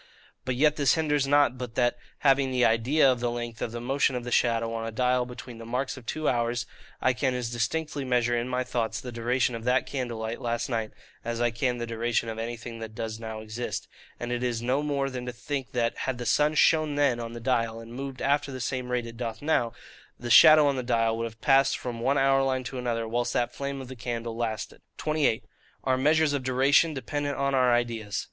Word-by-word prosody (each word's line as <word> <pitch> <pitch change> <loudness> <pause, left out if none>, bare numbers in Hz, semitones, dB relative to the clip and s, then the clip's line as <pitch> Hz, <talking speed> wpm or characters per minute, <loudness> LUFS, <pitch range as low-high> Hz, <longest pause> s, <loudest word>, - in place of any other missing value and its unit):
But 130 - -1
yet 150 +3 +3
this 140 -3 +4
hinders 150 -3 +1
not 145 -3 +3
but 120 -2 -6
that, 120 -1 +2 0.3
having 135 -1 +4
the 125 -1 +2
IDEA 130 +5 +4
of 125 - -1
the 120 0 0
length 120 -1 -5
of 115 - -2
the 120 - -5
motion 135 +2 +1
of 125 - -3
the 125 - -6
shadow 115 -2 +2
on 115 0 -3
a - - -4
dial 125 +2 +1
between 125 -1 -9
the - - -8
marks 125 +3 -2
of 125 -3 -13
two 155 -1 -2
hours, 120 -1 0 0.3
I 130 - +2
can 130 0 0
as 120 -2 -3
distinctly 140 +5 -2
measure 120 -2 +1
in 120 +1 -1
my 125 0 0
thoughts 115 -3 -2
the 125 +1 -7
duration 120 +2 0
of 115 -1 -5
that 125 0 +2
candle 125 -4 -4
light 110 +1 -4
last 120 +2 -2
night, 115 -3 -1 0.3
as 115 0 -3
I 120 0 +2
can 125 +1 -1
the 120 - -3
duration 115 0 -1
of 110 0 -5
anything 115 0 -5
that 110 -1 -7
does 110 0 -4
now 110 -1 -6
exist: 110 +3 -5 0.3
and 120 0 -4
it 120 0 -1
is 120 -2 -1
no 125 +4 0
more 140 -2 -1
than 125 -1 -5
to - - -2
think, 130 -1 -5
that, 115 -2 0
had 130 -2 -2
the 120 - -5
sun 150 +5 +3
shone 155 -2 +4
then 140 -5 +2
on 115 0 -5
the 120 - -6
dial, 115 -2 0
and 115 +1 -10
moved 135 +1 -6
after 145 +1 +1
the 130 - -6
same 130 0 -3
rate 125 -1 -1
it 115 0 -9
doth 115 -2 -4
now, 145 -5 +1 0.5
the 120 0 -4
shadow 155 +4 +9
on 140 -2 +2
the - - 0
dial 115 -2 +1
would 115 0 -2
have 110 -1 -9
passed 135 -1 +4
from 120 -2 -5
one 135 +4 +1
hour 135 0 +4
line 130 -1 0
to 125 +1 -5
another 115 -2 -2
whilst 120 +1 -1
that 120 - 0
flame 140 0 -4
of 130 - -7
the 130 - -8
candle 115 -1 -4
lasted. 110 -2 -4 0.2
28. 155 -7 +1 0.4
Our 130 - +2
measures 150 +3 +3
of 140 - 0
Duration 135 +5 +3
dependent 145 +1 -3
on 140 0 0
our 130 -2 +4
ideas. 115 -4 0
125 Hz, 235 wpm, -27 LUFS, 115-135 Hz, 0.5 s, shadow